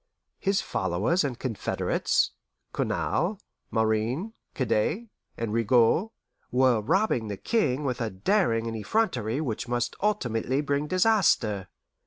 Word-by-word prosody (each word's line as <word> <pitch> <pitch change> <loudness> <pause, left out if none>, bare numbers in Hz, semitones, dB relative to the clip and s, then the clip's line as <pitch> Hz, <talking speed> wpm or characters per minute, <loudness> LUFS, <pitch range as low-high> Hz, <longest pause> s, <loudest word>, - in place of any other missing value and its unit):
His 195 0 +1
followers 95 - 0
and 130 -4 -2
confederates, 125 -6 0 0.4
Cournal, 195 +3 -1 0.3
Marin, 110 - 0 0.2
Cadet, 150 - 0 0.3
and 115 -2 -3
Rigaud, 115 - +3 0.4
were 125 -3 +3
robbing 120 - +1
the 100 -1 -4
King 150 - 0
with 125 -2 -2
a 115 - 0
daring 115 - +1
and 115 -1 -3
effrontery 120 - 0
which 120 -5 -3
must 120 0 -1
ultimately 130 - 0
bring 145 0 0
disaster. 180 - +2
125 Hz, 115 wpm, -27 LUFS, 110-185 Hz, 0.4 s, Rigaud